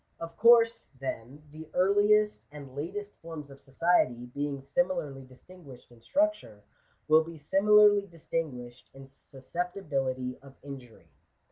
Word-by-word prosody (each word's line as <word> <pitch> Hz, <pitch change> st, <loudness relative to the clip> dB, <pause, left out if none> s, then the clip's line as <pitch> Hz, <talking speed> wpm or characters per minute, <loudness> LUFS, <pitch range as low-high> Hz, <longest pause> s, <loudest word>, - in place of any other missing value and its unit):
Of 165 Hz, 0 st, -8 dB
course, 230 Hz, +1 st, +5 dB
then, 135 Hz, +2 st, -6 dB
the 155 Hz, +1 st, -11 dB
earliest 205 Hz, +3 st, +3 dB
and 140 Hz, -3 st, -11 dB
latest 200 Hz, +8 st, -5 dB
forms 160 Hz, -4 st, -9 dB
of 135 Hz, 0 st, -14 dB
society, 135 Hz, -4 st, +1 dB
being 140 Hz, +3 st, -4 dB
similarly 145 Hz, -, -2 dB
distinguished 130 Hz, -1 st, -16 dB
in 120 Hz, -1 st, -19 dB
structure, 280 Hz, -, -1 dB, 0.4 s
will 155 Hz, +1 st, +5 dB
be 165 Hz, 0 st, -10 dB
similarly 205 Hz, +5 st, +4 dB
distin 165 Hz, -2 st, -4 dB
guished 125 Hz, -1 st, -11 dB
in 135 Hz, 0 st, -11 dB
susceptibility 135 Hz, -2 st, -4 dB
of 135 Hz, 0 st, -16 dB
injury. 135 Hz, -5 st, -11 dB
150 Hz, 125 wpm, -29 LUFS, 135-195 Hz, 0.4 s, course